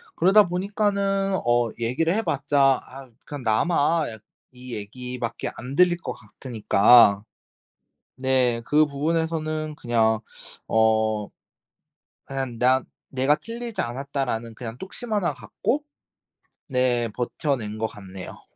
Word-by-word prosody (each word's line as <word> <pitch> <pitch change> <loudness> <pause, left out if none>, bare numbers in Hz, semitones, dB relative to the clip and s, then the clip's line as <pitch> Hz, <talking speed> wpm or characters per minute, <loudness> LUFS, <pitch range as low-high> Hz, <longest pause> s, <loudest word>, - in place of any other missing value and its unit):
그러다 200 +2 +5
보니까는 195 +1 0
어 120 -1 +3
얘기를 130 +9 +1
해봤자 145 - +2
아 135 0 -12 0.2
그냥 145 -3 -7
나만 150 +7 +2
약 110 -2 -10 0.3
이 125 -1 -8
얘기밖에 120 +3 -5
안 130 +2 -7
들릴 180 -1 +5
것 165 -7 -6
같으니까. 110 -2 +4 0.9
네. 130 -2 +1
그 150 +3 +4
부분에서는 155 +1 -2
그냥 115 -4 +1 0.5
어 110 -1 +2 1.0
한 135 -4 -4
'나 130 +1 +4 0.3
내가 135 +2 +2
틀리지 230 +1 -5
않았다.'라는 120 -2 -3
그냥 115 0 -7
뚝심 220 - -8
하나 205 -5 +1
갖고 290 +3 -2 0.9
네. 125 -3 +1
버텨낸 120 -1 -2
것 110 0 -1
같네요. 95 -3 -10
130 Hz, 230 characters per minute, -24 LUFS, 115-165 Hz, 1.0 s, 그러다